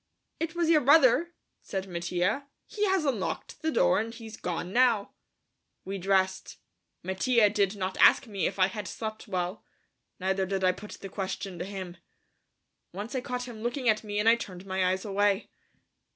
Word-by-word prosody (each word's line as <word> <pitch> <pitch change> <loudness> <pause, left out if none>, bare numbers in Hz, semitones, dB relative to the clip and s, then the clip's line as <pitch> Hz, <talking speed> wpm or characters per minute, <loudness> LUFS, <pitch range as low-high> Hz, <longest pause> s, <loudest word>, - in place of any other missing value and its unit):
"It 330 0 -3
was 340 -1 +1
your 310 -2 +5
brother," 310 +4 +5 0.3
said 190 0 -4
Mattia; 180 +9 -1 0.2
"he 420 -1 -1
has 380 -4 +2
unlocked 215 - -3
the 320 - 0
door - - +3
and 225 +1 -3
he's 225 -1 -9
gone 180 0 -4
now." 240 -5 +3 0.7
We 195 +1 -4
dressed. 190 0 0 0.5
Mattia 205 +4 +3
did 200 -1 +1
not 190 -1 -3
ask - - +6
me 200 -7 -1
if - - -5
I 185 - +5
had 200 +1 -5
slept 220 +1 -6
well, 185 0 -3 0.6
neither 190 0 0
did 190 0 -2
I 185 - +5
put 200 +3 -10
the 195 - -6
question 190 -2 -4
to 175 - -3
him. 190 -3 -7 0.9
Once 205 +6 -6
I 260 - -1
caught 250 0 -4
him 225 -3 -9
looking 240 +2 -2
at 215 0 +2
me 205 -1 -4
and 210 +2 +1
I 230 +1 +7
turned 185 -4 -8
my 190 -1 +1
eyes 190 +2 -3
away. 205 +1 +1
205 Hz, 180 wpm, -28 LUFS, 190-240 Hz, 0.9 s, I